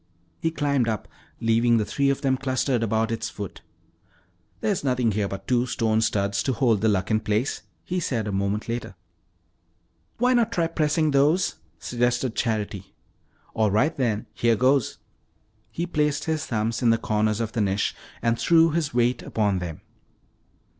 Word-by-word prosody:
He 165 - 0
climbed 140 -6 0
up, 110 -3 -2 0.3
leaving 115 +1 +3
the 105 - +1
three 140 +5 +1
of 140 - 0
them 135 -2 +2
clustered 130 -1 0
about 110 0 0
its 115 - -2
foot. 100 -3 -8 1.0
"Nothing 130 - +1
here 105 0 0
but 100 0 -7
two 125 0 +2
stone 110 -2 +1
studs 100 -2 0
to 130 - 0
hold 115 -5 +2
the 110 - +3
Luck 100 +1 0
in 110 - +3
place," 110 +5 -1 0.2
he 180 +1 -1
said 120 - -2
a - - -2
moment 100 +2 -1
later. 115 -4 -4 1.2
"Why 250 +2 +3
not 235 -2 +2
try 170 -7 +1
pressing 155 -1 +1
those?" 150 +7 +2 0.2
suggested 120 0 0
Charity. 105 -5 -3 0.6
"All 110 -1 +2
right, 135 +11 +2 0.4
here 115 -1 +2
goes." 130 +2 +2 0.7
He 170 - -3
placed 150 -4 0
his 155 -1 -2
thumbs 110 0 -1
in 120 - +4
the 115 - +4
corners 110 -1 0
of 115 -1 -2
the 115 - -1
niche 100 0 0 0.3
and 115 0 +1
threw 165 -1 +5
his 155 -4 -1
weight 120 +1 +2
upon 105 -4 0
them. 85 -3 -6
120 Hz, 160 wpm, -25 LUFS, 110-140 Hz, 1.2 s, threw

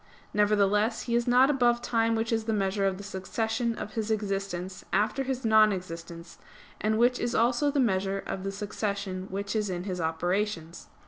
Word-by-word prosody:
Nevertheless 210 +1 +2
he 235 - -3
is 235 0 +1
not 255 +3 +5
above 240 -3 +3
time 230 -1 +1
which 225 +1 -1
is 225 -1 0
the 220 - 0
measure 195 -1 +1
of 190 -1 -1
the 200 - -8
succession 225 +4 -2
of 215 - -6
his 225 -2 -2
existence 195 -3 -3
after 215 +6 +1
his 265 -2 -3
non 215 -1 +6
existence, 170 -2 -7 0.4
and 215 0 +1
which 245 +2 +3
is 240 - -1
also 240 +5 +3
the 285 0 0
measure 195 -5 +1
of 190 - -4
the 195 - -2
succession 200 -2 -3
which 200 +2 -4
is 210 -2 0
in 180 -1 -3
his 185 -2 -3
operations. 170 +1 -2
210 Hz, 185 wpm, -28 LUFS, 190-230 Hz, 0.4 s, non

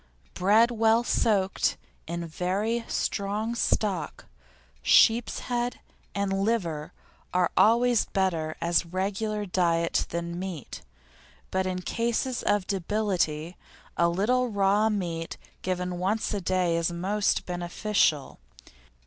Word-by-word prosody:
Bread 215 +6 +4
well 225 0 +3
soaked 200 -5 +1 0.3
in 170 +1 -4
very 195 +8 -1
strong 210 +3 -1
stock, 200 -7 -1 0.6
sheep's 230 +1 +4
head, 245 0 -2 0.4
and 200 -1 0
liver 170 -9 -1 0.4
are 180 -1 +2
always 235 +1 +4
better 165 -5 -1
as 170 +1 +2
regular 200 +4 -2
diet 170 -3 +1
than 170 +1 -4
meat, 180 - -6 0.7
but 190 0 0
in 185 0 -3
cases 235 +3 -1
of 205 -2 +1
debility 180 -5 -1 0.4
a 170 0 +3
little 240 +8 +1
raw 205 0 +2
meat 170 -6 -3 0.2
given 180 -1 -2
once 210 +5 0
a 205 - -2
day 180 -2 +1
is 170 +1 0
most 195 +4 0
beneficial. 175 -3 0
190 Hz, 110 wpm, -27 LUFS, 175-215 Hz, 0.7 s, Bread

